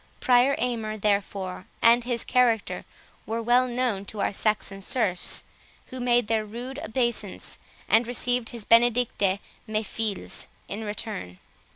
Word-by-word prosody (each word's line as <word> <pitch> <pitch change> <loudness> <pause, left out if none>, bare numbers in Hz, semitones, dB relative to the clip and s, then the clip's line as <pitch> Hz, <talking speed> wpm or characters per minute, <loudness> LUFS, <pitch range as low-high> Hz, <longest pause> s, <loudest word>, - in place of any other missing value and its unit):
Prior 255 +2 +4
Aymer, 225 -3 -2
therefore, 200 -3 -1
and 235 +1 +5
his 240 -2 0
character, 240 -4 +1 0.4
were 225 +1 -1
well 245 +2 +3
known 240 -5 -1
to 210 - -6
our 200 - 0
Saxon 200 -1 -1
serfs, 195 -4 0 0.5
who 255 - -5
made 245 -1 +3
their 220 0 +1
rude 245 +6 -7
obeisance, 235 - -2 0.3
and 225 +1 +4
received 245 -1 0
his 230 -3 -7
"benedicite, 230 -4 +3 0.3
mes 215 0 -1
filz," 215 -4 -2 0.2
in 210 +3 -5
return. 205 - -5
225 Hz, 135 wpm, -26 LUFS, 210-245 Hz, 0.5 s, and